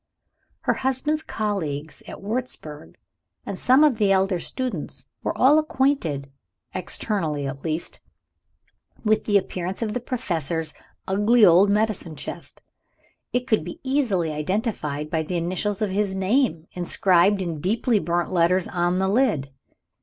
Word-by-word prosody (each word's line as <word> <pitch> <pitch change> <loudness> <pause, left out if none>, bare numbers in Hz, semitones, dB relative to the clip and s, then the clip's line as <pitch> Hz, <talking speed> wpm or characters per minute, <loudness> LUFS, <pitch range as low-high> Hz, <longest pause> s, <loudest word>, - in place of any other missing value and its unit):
Her - - +2
husband's 265 +4 0
colleagues 160 - -3
at - - -9
Wurzburg 200 - -5 0.5
and 195 - -5
some 260 +4 +5
of 275 -7 +3
the 205 -2 +3
elder 190 -1 +2
students, 245 - -4 0.2
were - - -3
all 290 +4 +6
acquainted 265 - 0 0.4
(externally, 165 -5 -2
at 135 0 -5
least) 160 +1 -4 1.1
with 215 0 +2
the 205 -2 +4
appearance 185 +1 -3
of 215 -2 -2
the 250 - -1
Professor's 170 - -2 0.3
ugly 210 +4 +5
old 185 +3 +6
medicine 210 -6 0
chest. - - -8 0.7
It 245 0 0
could 220 -4 +1
be - - -8
easily 240 - +1
identified 150 - -2
by 160 - +1
the 175 +3 -3
initials 185 +5 -1
of 205 - -1
his 200 0 0
name, 190 - +1
inscribed 185 +2 +3
in 170 -4 -3
deeply 220 - +1
burnt 175 +1 -1
letters 180 +1 +3
on 175 0 0
the 190 0 +1
lid. 195 - +1
190 Hz, 140 wpm, -24 LUFS, 165-225 Hz, 1.1 s, all